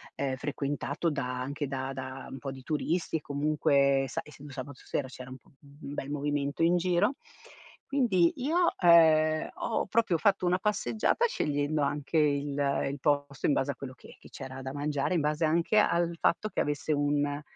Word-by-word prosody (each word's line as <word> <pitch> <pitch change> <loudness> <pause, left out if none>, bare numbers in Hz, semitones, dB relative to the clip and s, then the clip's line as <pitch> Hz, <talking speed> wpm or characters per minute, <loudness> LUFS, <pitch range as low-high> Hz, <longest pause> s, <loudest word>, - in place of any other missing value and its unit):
ehm, 135 -2 -1
frequentato 145 +3 -2
da 125 -3 -3
anche 140 +2 -3
da 135 0 -4
da 130 0 -7
un 135 - -7
po' 135 +2 -5
di 135 -1 -10
turisti, 160 +4 -1
e - - -8
comunque 140 -2 +2
sai, - - -4
essendo 145 -1 -12
sabato 135 0 -8
sera, 135 - -2
c'era 130 0 -10
un 130 - -8 0.2
bel 140 -1 -8
movimento 145 +1 -1
in 170 +2 +4
giro. 180 +9 +1 0.7
Quindi 210 -12 +3
io, 330 +7 +2
ehm, 155 -2 +5
ho 225 - -1
proprio 220 -7 +2
fatto 195 -3 +2
una 180 +1 +3
passeggiata, 215 - +1
scegliendo 145 - -1
anche 145 +3 -1
il 145 -1 +1 0.4
il 140 - -7
posto 145 -1 0
in 145 - +3
base 140 +1 0
a - - -8
quello 135 -2 -8
che - - -15
che - - -15
c'era 135 -1 -8
da 130 0 -5
mangiare, 145 +3 -1
in 165 - +2
base 150 +2 +1
anche 170 +7 +2
al 170 -3 +2
fatto, 215 +5 +1
che - - -4
avesse 145 0 -2
un 145 0 0
145 Hz, 180 wpm, -29 LUFS, 140-170 Hz, 0.7 s, ehm